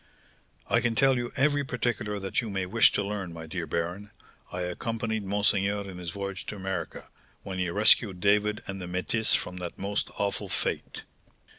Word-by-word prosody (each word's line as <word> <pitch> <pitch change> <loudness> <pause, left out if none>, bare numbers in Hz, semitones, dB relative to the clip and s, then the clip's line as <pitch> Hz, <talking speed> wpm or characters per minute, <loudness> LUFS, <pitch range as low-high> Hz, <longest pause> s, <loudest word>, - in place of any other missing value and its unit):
"I 115 - +3
can 115 -2 +1
tell 135 +2 +5
you 120 -1 -2
every 145 +1 +3
particular 110 -5 -1
that 95 +3 0
you 115 - -5
may 95 -2 -1
wish 115 +5 +6
to 105 - +1
learn, 100 -3 -3
my 80 -1 -7
dear 80 +1 -4
baron; 90 +5 -2 0.4
I 90 - -3
accompanied 110 +4 -2
monseigneur 100 0 +1
in 90 -2 -8
his 90 -2 -4
voyage 100 +1 -5
to - - -4
America, 95 -3 -4 0.4
when 95 -1 -4
he 90 -1 0
rescued 100 0 +5
David 105 +2 +2
and 95 0 -5
the 90 - -5
métisse 90 +5 +1
from 90 0 -6
the 90 -1 -3
most 100 +1 -1
awful 100 0 -1
fate." - - -2
100 Hz, 180 wpm, -28 LUFS, 90-110 Hz, 0.4 s, wish